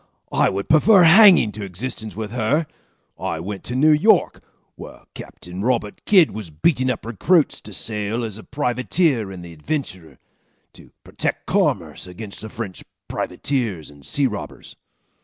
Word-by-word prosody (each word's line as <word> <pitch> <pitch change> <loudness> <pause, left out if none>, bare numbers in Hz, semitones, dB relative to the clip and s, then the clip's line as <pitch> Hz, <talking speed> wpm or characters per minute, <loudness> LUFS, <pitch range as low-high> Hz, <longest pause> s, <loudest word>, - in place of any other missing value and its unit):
I - - +3
would 100 +1 -4
prefer 185 +5 +6
hanging 175 - +7
to 105 - -7
existence 110 +2 -6
with 105 -1 -5
her. 125 +7 0 0.5
I - - -3
went 95 +3 -6
to 125 - -4
New 150 +4 +4
York, 155 +9 +3 0.3
where - - -12
Captain 90 +2 -9
Robert 115 -2 -1
Kidd 185 -6 +5
was 105 -5 -7
beating 130 - +1
up 130 - -3
recruits 145 - +1
to 105 - -11
sail 105 +3 -3
as 110 -2 -5
a - - -11
privateer 125 - 0
in 90 -2 -9
the 85 -1 -10
Adventurer 90 - -5 0.6
to - - -16
protect - - -4
commerce - - -1
against 100 +3 -9
the 110 - -7
French 105 -4 -7 0.2
privateers 110 - -3
and 70 -1 -17
sea 140 - 0
robbers. 105 -5 -6
110 Hz, 155 wpm, -21 LUFS, 100-145 Hz, 0.6 s, hanging